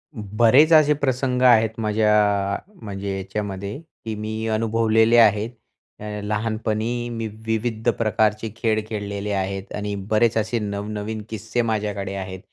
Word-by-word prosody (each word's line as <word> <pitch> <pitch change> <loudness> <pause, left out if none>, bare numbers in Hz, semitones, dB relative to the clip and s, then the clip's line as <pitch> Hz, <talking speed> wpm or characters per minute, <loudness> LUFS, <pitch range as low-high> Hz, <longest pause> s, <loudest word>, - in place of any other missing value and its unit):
बरेच 115 +8 +4
असे 150 -1 +6
प्रसंग 130 -3 -1
आहेत 115 -3 +6
माझ्या, 105 -2 +2 0.2
म्हणजे 100 -2 -4
याच्यामध्ये, 100 +1 -4 0.3
की 110 - -3
मी 110 +1 -4
अनुभवलेले 115 +1 +3
आहेत. 110 -1 +5 0.5
अ, - - -10 0.2
लहानपणी 110 +2 -2
मी 115 -1 -3 0.2
विविध 110 +1 0
प्रकारचे 110 0 +1
खेळ 110 -1 +1
खेळलेले 105 -1 -4
आहेत 95 0 -3
आणि 105 0 -3 0.2
बरेच 110 +1 +3
असे 110 +2 0
नवनवीन 105 +1 -4
किस्से 110 +2 -2
माझ्याकडे 105 -4 -2
आहेत 95 -1 -6
110 Hz, 125 wpm, -22 LUFS, 105-115 Hz, 0.5 s, असे